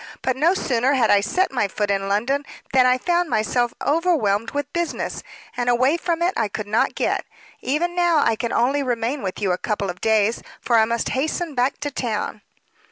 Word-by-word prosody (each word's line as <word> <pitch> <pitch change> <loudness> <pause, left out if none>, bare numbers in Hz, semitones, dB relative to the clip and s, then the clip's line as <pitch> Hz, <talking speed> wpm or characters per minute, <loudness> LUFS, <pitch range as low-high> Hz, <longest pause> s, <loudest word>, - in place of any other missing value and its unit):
"But 260 - +1
no 325 +8 +3
sooner 255 -5 +1
had 245 -5 +3
I 205 - +5
set 370 - 0
my 245 -6 0
foot 205 +1 -2
in 195 0 -1
London 245 +8 0 0.3
than 255 -1 +5
I 250 0 +4
found 345 +4 0
myself 240 +2 +1
overwhelmed 280 - +1
with 290 +1 -4
business, 340 -1 -3 0.3
and 245 0 -1
away 255 +5 +3
from 340 0 -1
it 360 +2 +1
I 225 - +1
could 210 +1 -5
not 215 +2 +1
get. - - 0 0.4
Even 320 +7 -1
now 345 -2 +2
I 230 - +2
can 235 +1 -3
only 270 +4 +2
remain 245 +1 -1
with 190 -2 -4
you 195 -3 0
a 180 - -1
couple 200 -4 -2
of 180 - -15
days, 220 0 +2 0.2
for 235 -2 +2
I 220 - +5
must 235 +1 -1
hasten 310 +4 -2
back 255 +1 0
to 290 0 -3
town." 220 -5 -3
245 Hz, 205 wpm, -22 LUFS, 220-290 Hz, 0.4 s, I